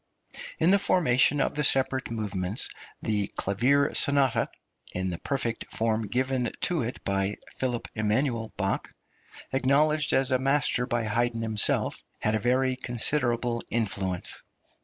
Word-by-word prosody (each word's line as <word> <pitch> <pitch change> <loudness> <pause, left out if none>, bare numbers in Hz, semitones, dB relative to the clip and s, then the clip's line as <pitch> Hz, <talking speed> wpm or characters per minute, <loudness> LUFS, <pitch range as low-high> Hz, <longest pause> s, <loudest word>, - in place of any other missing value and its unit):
In - - +3
the 200 - +5
formation 145 -7 +3
of - - +1
the 150 - -1
separate 130 -1 +3
movements 100 -2 -2 0.3
the 105 -2 0
clavier 130 +9 +2
sonata 140 -3 +3 0.4
(in 95 0 -2
the 85 - -5
perfect 120 -5 -3
form 110 -1 -1
given 125 +2 -1
to 175 -4 0
it 120 +2 -5
by 100 +1 -1 0.2
Ph. 125 -3 -1
Eman. 115 +2 0
Bach, 100 -1 -1 0.7
acknowledged 150 +3 +2
as 135 -1 +2
a 130 - +3
master 135 -2 +1
by 120 -1 -1
Haydn 115 +1 -1
himself) 110 -2 +1
had 110 - 0
a 110 - +1
very 130 +3 +1
considerable 120 -1 +2
influence. 95 -5 -2
120 Hz, 135 wpm, -27 LUFS, 110-135 Hz, 0.7 s, the